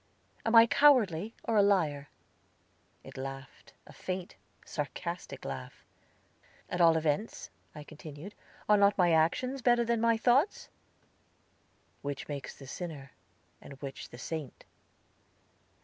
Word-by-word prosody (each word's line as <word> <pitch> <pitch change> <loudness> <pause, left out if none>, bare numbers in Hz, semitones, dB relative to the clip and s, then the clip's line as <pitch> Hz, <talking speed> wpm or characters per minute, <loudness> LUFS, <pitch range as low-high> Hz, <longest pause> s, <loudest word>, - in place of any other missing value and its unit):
"Am 225 - +2
I 230 0 +10
cowardly, 225 - +4
or 225 -2 0
a - - +7
liar?" 160 -8 +1 0.9
It - - -12
laughed, 135 0 -8
a - - -14
faint, 185 -1 -5 0.3
sarcastic 170 +4 -5
laugh. 65 -2 -7 0.9
"At 180 - 0
all 165 -1 +6
events," 160 +7 -2 0.2
I 150 - -8
continued, 155 +5 -10 0.3
"are 210 - +6
not 200 0 +4
my 175 -2 +4
actions 250 +12 +1
better 240 -1 +3
than 235 -1 0
my 230 -1 +3
thoughts?" 260 - +2 1.3
"Which 140 -1 -5
makes 140 -3 -6
the 135 - -11
sinner, 140 -2 -7 0.5
and - - -11
which 135 -1 -7
the - - -11
saint?" 150 +1 -6
170 Hz, 125 wpm, -31 LUFS, 145-225 Hz, 1.3 s, I